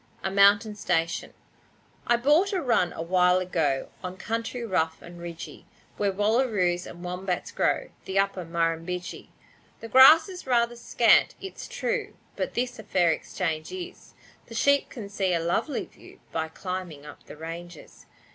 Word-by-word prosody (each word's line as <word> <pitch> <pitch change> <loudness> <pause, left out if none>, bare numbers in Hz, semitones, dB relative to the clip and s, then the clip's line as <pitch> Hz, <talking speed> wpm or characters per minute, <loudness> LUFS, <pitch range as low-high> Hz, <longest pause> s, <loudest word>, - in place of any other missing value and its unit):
A 190 - -1
Mountain 200 +2 +5
Station 165 -4 -1 0.8
I 240 - +4
bought 300 +11 +3
a 380 - +1
run 240 - +2
a 165 - -5
while 180 +1 +3
ago, 160 -7 -1
On 185 0 -6
country 230 +3 -3
rough 165 -6 0
and 175 0 -12
ridgy, 170 -1 -9 0.3
Where 200 -1 +1
wallaroos 205 -4 +1
and 175 +1 -10
wombats 180 0 -3
grow - - 0
The 190 - -3
Upper 195 -2 +1
Murrumbidgee. 165 +1 -3 0.5
The 225 - -8
grass 270 +7 +8
is 365 -6 -9
rather 240 -1 +2
scant, 235 - +3
it's 385 0 -8
true, - - -3 0.2
But - - -3
this 245 0 -2
a - - -8
fair 180 -5 +2
exchange 160 0 -3
is, 370 0 -9 0.3
The 230 - -10
sheep 280 +4 +3
can 225 -6 -8
see 195 -3 0
a - - +1
lovely 170 - -1
view - - -17
By 160 0 -2
climbing 175 -3 -6
up - - -12
the - - -11
ranges. 165 +1 -9
190 Hz, 155 wpm, -26 LUFS, 170-240 Hz, 0.8 s, grass